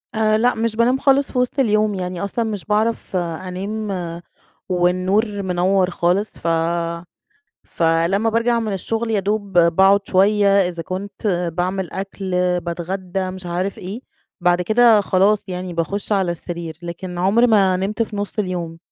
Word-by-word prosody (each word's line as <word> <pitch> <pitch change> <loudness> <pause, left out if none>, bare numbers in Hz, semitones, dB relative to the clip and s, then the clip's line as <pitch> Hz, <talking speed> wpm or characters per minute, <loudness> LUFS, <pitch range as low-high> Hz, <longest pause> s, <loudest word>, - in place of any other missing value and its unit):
آآ 215 0 +3
لأ 245 +3 +2
مش 225 0 -1
بانام 240 +3 +3
خالص 275 0 +2
في - - -4
وسط 250 +2 0
اليوم 215 -4 +2
يعني 180 -2 -4
أصلًا 225 +4 -2
مش 210 -4 -4
باعرف 215 -1 -1
أنام 185 +1 -4 0.5
والنور 185 +4 +1
منوَّر 185 +1 +1
خالص 180 +4 0
ف - - -6 1.2
فلمّا 170 +6 +1
بارجع 230 +1 +1
من 220 -2 -2
الشغل، 225 +4 -2
يدوب 205 -2 0
ب 170 -1 +4
باقعد 195 +1 +5
شويّة 200 +2 +3 0.2
إذا 170 -2 -5
كنت 195 +4 -6 0.3
باعمل 185 +1 -2
أكل 195 0 -5 0.3
باتغدى 185 +2 -4
مش 185 -1 -7
عارف 180 +3 -2
إيه، 195 +6 -6 0.4
بعد 175 0 +2
كده 220 +2 +5
خلاص 200 +2 +3
يعني 180 -1 -5
باخش 195 +6 -2
على 190 -4 +1
السرير 170 -1 -6
لكن 175 +1 -6
عُمري 200 +7 +4
ما 195 -5 +4
نمت 200 +4 -1
في 215 -2 -5
نُص 205 +1 -4
اليوم. 175 -4 -3
195 Hz, 150 wpm, -20 LUFS, 180-215 Hz, 1.2 s, باقعد